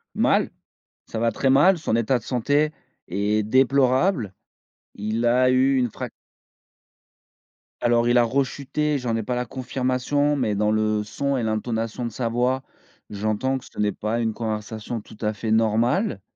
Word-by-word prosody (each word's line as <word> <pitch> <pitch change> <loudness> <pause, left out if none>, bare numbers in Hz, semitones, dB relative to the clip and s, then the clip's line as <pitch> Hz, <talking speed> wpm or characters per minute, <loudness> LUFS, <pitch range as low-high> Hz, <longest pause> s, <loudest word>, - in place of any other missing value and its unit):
Mal, - - +2 0.6
ça 110 - -5
va 115 0 +2
très 135 +5 0
mal, 170 +8 +5
son 150 -8 -1
état 115 +2 +1
de - - -19
santé 145 +5 +1 0.4
est 105 +3 0
déplorable. 130 - +2 0.6
Il 110 +3 -2
a 125 +2 +4
eu 130 +1 +3
une 125 -2 +2
frac. - - -6 1.7
Alors 120 0 +3
il 120 +1 +4
a 120 - +6
rechuté, 140 +4 -1
j'en 120 -3 -2
ai 115 - -2
pas 125 +4 -2
la 125 0 -1
confirmation, 130 +3 -1
mais 110 -6 0
dans 105 +1 +1
le 110 -1 +1
son 140 +6 -2
et 125 - -1
l'intonation 110 +2 -2
de - - -2
sa 115 +1 -3
voix, 125 +3 0 0.5
j'entends 110 +6 -1
que 130 - -11
ce - - -17
n'est 105 0 +2
pas 110 +3 -2
une 110 -1 0
conversation 110 +1 -4
tout 105 - -15
à 105 -1 0
fait 110 +1 -4
normale. 115 - +2
120 Hz, 165 wpm, -23 LUFS, 110-130 Hz, 1.7 s, a